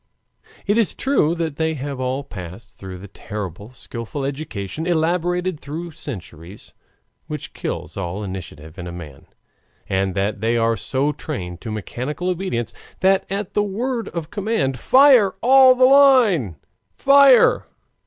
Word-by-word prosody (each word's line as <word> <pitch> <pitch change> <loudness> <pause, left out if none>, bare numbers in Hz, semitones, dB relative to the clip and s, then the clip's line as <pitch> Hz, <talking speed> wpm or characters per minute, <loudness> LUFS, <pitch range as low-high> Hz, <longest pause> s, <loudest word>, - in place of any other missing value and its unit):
It 205 +3 +2
is 225 - +1
true 215 - +1
that 165 -4 -3
they 160 0 0
have 140 -1 -5
all 130 +2 -2
passed 95 -2 -10
through 95 -1 -9
that 95 +1 -13
terrible, 105 +1 -7
skillful 120 +2 -6
education, 140 - -5
elaborated 175 +1 0
through 165 +4 -7
centuries, 100 - -9 0.5
which - - -7
kills - - -5
all 95 +1 -4
initiative 85 -4 -8
in 90 - -6
a - - -6
man, 80 -6 -10 0.6
and 95 -1 -1
that 100 +1 -1
they 115 +1 +1
are 115 0 +2
so 140 +4 -1
trained 90 - -6
to 110 - -6
mechanical 125 - -4
obedience 165 - -3 0.3
that 190 0 +3
at 200 -1 -3
the 210 - +2
word 230 +4 -2
of 165 -2 -6
command: 195 - -1
"Fire! 255 - +5
All 260 +1 +7
the 255 0 +5
line! 255 - +5 0.4
Fire!" 275 -2 +5
145 Hz, 145 wpm, -21 LUFS, -, 0.6 s, All